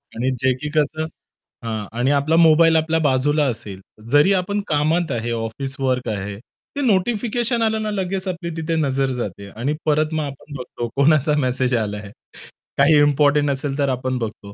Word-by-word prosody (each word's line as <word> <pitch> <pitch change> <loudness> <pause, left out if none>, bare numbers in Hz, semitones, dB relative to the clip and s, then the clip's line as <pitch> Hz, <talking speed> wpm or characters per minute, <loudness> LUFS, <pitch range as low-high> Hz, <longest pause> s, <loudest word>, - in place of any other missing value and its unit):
आणि 125 +3 0
जे 130 +1 +2
की 150 - -3
कसं 155 +1 +1 0.6
हां 110 -2 -3
आणि 130 +3 +2
आपला 145 +3 +2
मोबाईल 165 0 +6
आपल्या 160 0 +2
बाजूला 145 +1 +2
असेल, 105 -6 -4 0.3
जरी 145 +7 +5
आपण 200 +2 0
कामात 160 +3 +1
आहे 120 0 -2
ऑफिस 115 +4 -4
वर्क 130 -1 0
आहे, 100 -1 -4 0.4
ते 285 - -2
नोटिफिकेशन 235 +1 +1
आलं 220 -1 +1
ना 215 - -2
लगेच 190 -1 -3
आपली 170 -2 -4
तिथे 165 0 -2
नजर 135 -3 0
जाते 100 -3 -5
आणि 120 +8 -2
परत 155 +1 +1
मग 155 -1 0
आपण 140 +1 -8
बघतो 120 -1 -5
कोणाचा 150 +1 +3
मेसेज 130 -2 0
आला 105 -3 -1
आहे. 100 -1 -9 0.7
काही 145 +2 +5
इम्पोर्टंट 145 0 +3
असेल 140 +1 -2
तर 140 -1 +1
आपण 130 0 -2
बघतो. 105 -3 -6
145 Hz, 175 wpm, -21 LUFS, 125-160 Hz, 0.7 s, मोबाईल